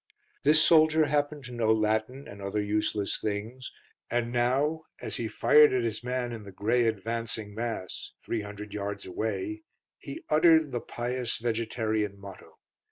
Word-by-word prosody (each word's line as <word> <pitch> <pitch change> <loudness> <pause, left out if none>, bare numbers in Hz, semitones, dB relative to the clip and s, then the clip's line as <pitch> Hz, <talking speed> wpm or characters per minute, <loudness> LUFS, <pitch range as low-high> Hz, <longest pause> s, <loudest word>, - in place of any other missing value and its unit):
This 150 +2 +5
soldier 155 -1 +5
happened 145 0 0
to 125 - -9
know 115 -2 +1
Latin 110 +5 0
and 100 0 -10
other 100 +2 -2
useless 105 0 -1
things, 110 +5 -4 0.4
and 120 0 0
now, 135 +6 +1 0.2
as - - -3
he 115 - -2
fired 150 +5 +5
at 125 -2 +1
his 115 0 -2
man 125 0 -2
in 115 -2 -6
the 100 -1 -10
grey 115 +5 +1
advancing 110 0 -3
mass 110 -4 -5
300 105 -2 -5
yards 100 -1 -4
away 105 +2 -3 0.4
he 140 - -8
uttered 160 -1 +5
the 120 -2 -2
pious 120 0 -3
vegetarian 110 -3 -1
motto. 100 -1 -12
115 Hz, 150 wpm, -28 LUFS, 105-125 Hz, 0.4 s, This